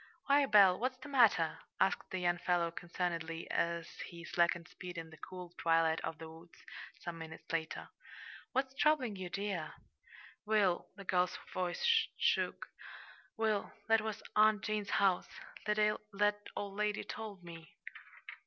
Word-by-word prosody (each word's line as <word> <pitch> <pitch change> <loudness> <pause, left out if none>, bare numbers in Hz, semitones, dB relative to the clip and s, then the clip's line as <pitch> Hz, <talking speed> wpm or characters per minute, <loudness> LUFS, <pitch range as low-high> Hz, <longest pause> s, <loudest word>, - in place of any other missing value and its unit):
"Why, 280 0 +4
Belle, 200 -5 +7
what's 255 +1 -1
the 265 +3 -10
matter?" 225 - +4 0.2
asked 190 - +1
the 190 - -3
young 175 -1 +1
fellow 175 -2 +1
concernedly, 170 -1 -3
as 170 0 0 0.2
he 170 -1 -10
slackened 170 0 +1
speed 180 -1 -9
in 165 -1 -6
the 160 - -12
cool 180 0 -9
twilight 165 -1 +3
of 160 - -4
the 160 - -8
woods, 165 +2 -15 0.3
some 170 -1 -6
minutes 160 0 -8
later. 160 -1 -2 0.6
"What's 265 0 0
troubling 270 -6 +2
you, 185 -2 -5
dear?" 195 -4 -3 0.7
"Will" 210 -5 +2
the 200 - -9
girl's 180 -1 +1 0.2
voice 180 - -1 0.3
shook - - +1 0.7
"Will, 220 -2 0 0.2
that 225 -1 +5
was 220 -1 -4
Aunt 215 0 +5
Jane's 210 -2 -2
house. 190 -3 +3 0.4
That 210 0 +2 0.8
old 200 -1 -4
lady 210 0 0
told 210 -4 -7
me." 165 -1 -11
180 Hz, 145 wpm, -35 LUFS, 170-215 Hz, 0.8 s, Belle